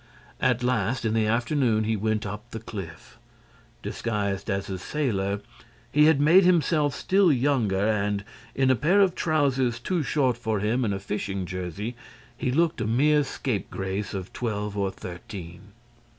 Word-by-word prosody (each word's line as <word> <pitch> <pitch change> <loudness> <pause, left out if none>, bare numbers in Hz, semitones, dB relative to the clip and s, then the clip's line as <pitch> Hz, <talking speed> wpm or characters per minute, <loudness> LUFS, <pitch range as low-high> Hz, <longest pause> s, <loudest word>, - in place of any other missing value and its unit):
At 125 -1 +2
last, 120 -1 0
in 110 - +1
the 110 -1 +2
afternoon, 115 -1 +1
he 110 +1 0
went 110 +1 -1
up 105 +3 -6
the 115 - -6
cliff. 95 -7 -9 0.6
Disguised 100 -3 -2
as 100 -1 -1
a 95 -1 -4
sailor, 100 - -1 0.5
he 150 +2 +5
had 155 -2 +5
made 165 +7 +6
himself 155 -5 +3
still 190 -2 +3
younger 120 -8 +1
and, 105 -1 0 0.3
in 135 -1 +3
a - - +4
pair 170 - +3
of 190 -3 +4
trousers 135 -8 +1
too 175 +8 -1
short 130 -4 +1
for 110 -3 -1
him 110 +5 0
and 110 - 0
a - - -4
fishing 100 -1 -3
jersey, 90 +6 -5 0.4
he 125 - -2
looked 165 -1 +1
a 110 - -1
mere 145 +6 +3
scape 125 -7 -3
grace 95 +2 -3
of 95 -2 -6
twelve 105 -5 -3
or 100 -1 0
thirteen. 90 0 -9
115 Hz, 165 wpm, -26 LUFS, 100-135 Hz, 0.6 s, made